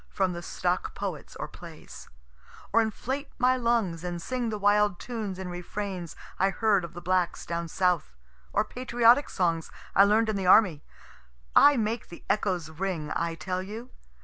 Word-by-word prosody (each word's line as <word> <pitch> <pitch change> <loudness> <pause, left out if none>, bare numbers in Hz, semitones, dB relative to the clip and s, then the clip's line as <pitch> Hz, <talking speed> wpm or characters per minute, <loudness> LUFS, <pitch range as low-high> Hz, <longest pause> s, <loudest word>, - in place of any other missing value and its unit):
from 190 -2 0
the 170 - -6
stock - - -2
poets - - -5
or - - -5
plays - - -12 0.6
or 230 - +6
inflate 260 +6 -3
my 255 +1 +4
lungs 230 -9 0
and 175 -1 -3
sing 245 +5 -2
the 215 - -3
wild 205 -1 +3
tunes 215 -5 -5
and 185 -1 -5
refrains 180 0 -5 0.2
I 195 - +4
heard 205 -2 +2
of 170 -1 -7
the 175 - -8
blacks 185 -1 0
down 170 0 -3
south, 175 - 0 0.4
or - - +1
patriotic 245 +1 +3
songs 165 -3 0 0.3
I 195 - +8
learn'd 220 +2 +3
in 215 - 0
the 190 -2 -2
army. 185 -6 +6 0.7
I 290 -1 +7
make 225 0 -2
the 170 - -11
echoes 180 -6 -1
ring, 165 -2 -3
I 170 -1 -1
tell 180 +3 -3
you! 220 +6 -8
195 Hz, 170 wpm, -28 LUFS, 175-225 Hz, 0.7 s, I